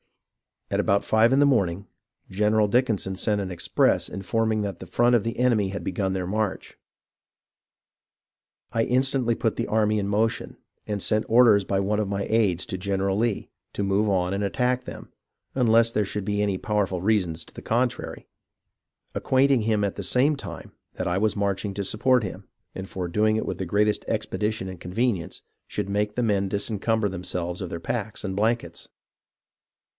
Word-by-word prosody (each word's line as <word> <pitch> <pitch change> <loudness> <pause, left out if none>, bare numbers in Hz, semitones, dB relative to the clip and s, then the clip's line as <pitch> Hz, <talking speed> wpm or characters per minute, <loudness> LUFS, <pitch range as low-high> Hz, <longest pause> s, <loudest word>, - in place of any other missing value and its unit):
About 100 +1 +2
five 110 +2 +4
in 135 - +4
the 145 - +6
morning, 100 -8 +1 0.4
General 105 +2 +2
Dickinson 105 -5 +1
sent 105 0 0
an 95 -1 -4
express 85 -1 +1
informing 110 +2 -1
that 100 -4 -4
the 95 - -9
front 120 +7 +3
of 115 - +2
the 115 - -3
enemy 115 -6 +2
had 100 - -5
begun 95 0 -1
their 95 -1 -2
march. 105 +1 -3 1.9
I 115 0 +1
instantly 130 -1 +1
put 115 - -1
the - - -1
army 105 -1 +2
in 100 - -2
motion, 110 +3 -1 0.3
and 105 -2 -2
sent 110 0 +1
orders 110 -4 +5
by 95 0 0
one 105 +2 0
of 105 - 0
my 100 0 -2
aids 105 -6 +1
to 95 - -4
General 95 +1 -1
Lee, 115 -1 -1 0.2
to 100 - -2
move 100 +2 +1
on 90 -1 +1
and 100 +1 -1
attack 125 +4 0
them, - - -9 0.4
unless 115 -2 +4
there 105 -2 +1
should 100 0 -4
be 105 0 0
any 100 -2 0
powerful 100 -3 -1
reasons 90 -6 +1
to - - -17
the - - -9
contrary; 120 +2 -2 0.9
acquainting 130 -2 +2
him 105 -1 +1
at 100 - -2
the 100 - -4
same 135 +9 +2
time - - -8 0.2
that - - -4
I 90 +1 0
was 105 +1 +1
marching 100 0 -1
to 100 - -2
support 125 +5 +2
him, 95 0 -7 0.3
and 95 0 -7
for 90 -2 -4
doing 110 +4 +2
it 110 - -1
with - - -3
the 95 - -3
greatest 105 +3 +1
expedition 105 -3 -2
and 95 -2 -9
convenience, 95 -1 -2 0.2
should 100 - -4
make 105 +1 -1
the 125 - 0
men 100 -3 +1
disencumber 105 +1 0
themselves 90 -1 -4
of 90 - -4
their 85 - -5
packs 110 0 -3
and 95 -2 -3
blankets. 110 -6 -1
105 Hz, 180 wpm, -25 LUFS, 95-115 Hz, 1.9 s, the